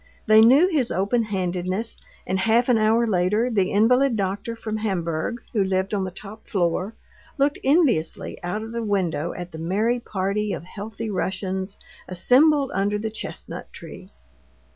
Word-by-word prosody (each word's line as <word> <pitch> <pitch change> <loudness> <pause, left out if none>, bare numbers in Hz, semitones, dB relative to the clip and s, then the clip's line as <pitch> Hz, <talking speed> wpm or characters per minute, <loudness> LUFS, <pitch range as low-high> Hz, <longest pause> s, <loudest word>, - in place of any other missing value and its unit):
They 215 0 +7
knew 265 +10 +6
his 295 -10 0
open 205 +6 +1
handedness; 185 +2 -2 0.3
and 190 +1 -1
half 230 +5 +2
an 235 -3 +4
hour 220 +2 +3
later 210 +4 +1
the 195 -4 +1
invalid 250 +5 +3
doctor 200 +3 -2
from 220 -1 -4
Hamburg, 190 +1 -2
who 210 -4 +2
lived 190 +1 -1
on 195 -2 0
the - - -3
top 200 +3 -11
floor, 185 +3 -1 0.4
looked 280 +1 +1
enviously 270 - +1
out 180 +5 -3
of 225 - -7
the 235 0 -3
window 180 -7 -1
at 175 -1 -7
the 160 - -8
merry 210 +9 0
party 205 -1 -2
of - - -5
healthy 215 +4 -6
Russians 190 +1 -3 0.3
assembled 270 - +3
under 200 +2 0
the 220 +1 -4
chestnut 220 - -8
tree. - - -11
210 Hz, 160 wpm, -23 LUFS, 185-230 Hz, 0.4 s, They